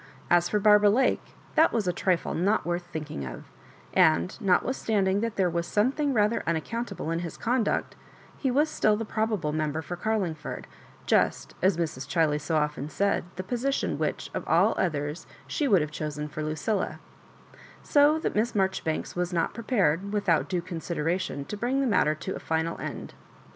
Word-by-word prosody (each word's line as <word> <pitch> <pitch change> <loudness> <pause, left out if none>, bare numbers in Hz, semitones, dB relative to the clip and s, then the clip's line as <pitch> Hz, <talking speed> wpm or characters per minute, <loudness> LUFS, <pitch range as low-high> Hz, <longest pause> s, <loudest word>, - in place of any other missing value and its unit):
As 175 0 +4
for 210 - +1
Barbara 210 0 +6
Lake, 255 +6 +2 0.3
that 320 +1 +5
was 220 -5 0
a 180 - +1
trifle 180 -1 0
not 195 +2 +1
worth 175 +1 -2
thinking 150 - -5
of; - - -7 0.5
and, 85 +1 +3
notwithstanding 200 -1 +1
that 230 -1 -2
there 190 -2 +2
was 170 0 -2
something 270 +7 +1
rather 225 -1 +2
unaccountable 180 +1 -2
in 165 - 0
his 170 -2 -6
conduct, 240 -1 0 0.4
he 270 - -1
was 290 +5 +3
still 215 -8 +2
the 225 - -3
probable 215 -8 -1
member 155 0 -1
for 175 - -5
Carlingford, 180 -5 -2 0.4
just, - - +1
asMrs* 170 -7 +1
Ohiley 155 -3 +1
so 155 +2 -1
often 150 -1 -1
said, 200 +2 0
the 185 - -4
position 245 +7 -1
which, - - -2
of - - -3
all - - +4
others, 150 -2 -2 0.2
she 295 - -1
would 195 -9 +5
have 150 0 -3
chosen 150 -1 -4
for 155 +1 -6
LuciUa; 155 +7 -1 0.9
so 295 +1 +4
that 320 - -2
Miss 225 +3 +1
Marjoribanks 190 -5 -1
was 180 0 -1
not 170 -2 0
prepared, 200 - 0
without 200 -6 +1
due 180 -3 -1
consideration, 170 -3 -2
to 210 - -5
bring 245 +6 0
the 275 - +2
matter 170 - +3
to 155 - -5
a - - -6
final 160 +1 -1
end. - - -6
185 Hz, 170 wpm, -27 LUFS, 160-220 Hz, 0.9 s, Barbara